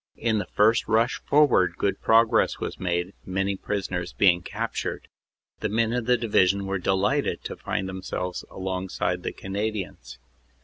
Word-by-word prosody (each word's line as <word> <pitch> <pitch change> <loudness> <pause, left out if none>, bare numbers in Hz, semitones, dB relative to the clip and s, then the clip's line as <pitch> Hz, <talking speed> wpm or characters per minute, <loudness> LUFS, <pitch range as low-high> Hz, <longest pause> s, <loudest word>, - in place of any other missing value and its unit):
In 110 -2 +1
the - - -4
first 110 +2 +3
rush 115 +2 +2
forward 125 - +4
good 100 - -1
pro 115 +1 +6
gress 110 0 +1
was - - -5
made, 90 +1 -1
many 95 +1 -1
prisoners 95 -3 -3
being 90 -3 +4
captured. - - -4 0.5
The - - -1
men 115 +2 +1
of 125 -2 -2
the 125 0 +4
Division 100 -4 +2
were 95 0 -2
delighted 95 +2 0
to - - -5
find 95 - -3
themselves 95 -1 -4
alongside 95 -1 -2
of - - -17
the - - -3
Canadians. 95 - -5
95 Hz, 160 wpm, -25 LUFS, 90-110 Hz, 0.5 s, pro